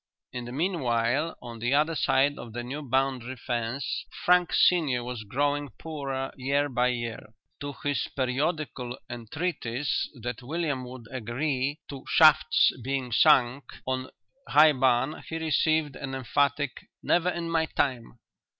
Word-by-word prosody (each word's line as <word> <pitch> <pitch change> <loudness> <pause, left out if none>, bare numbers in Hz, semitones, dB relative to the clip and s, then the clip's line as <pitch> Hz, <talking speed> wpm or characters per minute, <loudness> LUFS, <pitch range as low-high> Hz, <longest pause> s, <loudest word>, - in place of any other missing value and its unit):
In 125 -1 -5
the 120 - -7
meanwhile, 140 -2 0
on 120 -2 -8
the 120 +4 +1
other 155 +3 +2
side 145 -1 +2
of 115 -2 -9
the 120 +1 -4
new 135 +5 -5
boundary 130 -2 -1
fence, 120 +2 -3 0.2
Frank 180 -1 +4
senior 145 -9 +3
was 125 -2 -5
growing 145 +6 -1
poorer 135 -4 -4
year 140 +2 +1
by 125 -1 +2
year. 120 -3 -3 0.3
To 145 -1 -5
his 145 -1 0
periodical 130 -1 -2
entreaties 125 +1 -2
that 120 0 -5
William 145 -1 -2
would 125 -1 -10
agree 130 +3 -2
to 135 -2 -7
shafts 155 -1 +6
being 135 -1 -2
sunk 130 0 +4 0.2
on 130 0 -2 0.4
High 150 +1 +7
Barn 130 +2 +1
he 160 - -3
received 155 -2 +1
an 135 -1 -5
emphatic 140 +2 +1 0.3
"Never 175 +1 +2
in 170 -1 -3
my 165 -1 +1
time!" 125 -5 -2
135 Hz, 140 wpm, -27 LUFS, 125-150 Hz, 0.4 s, High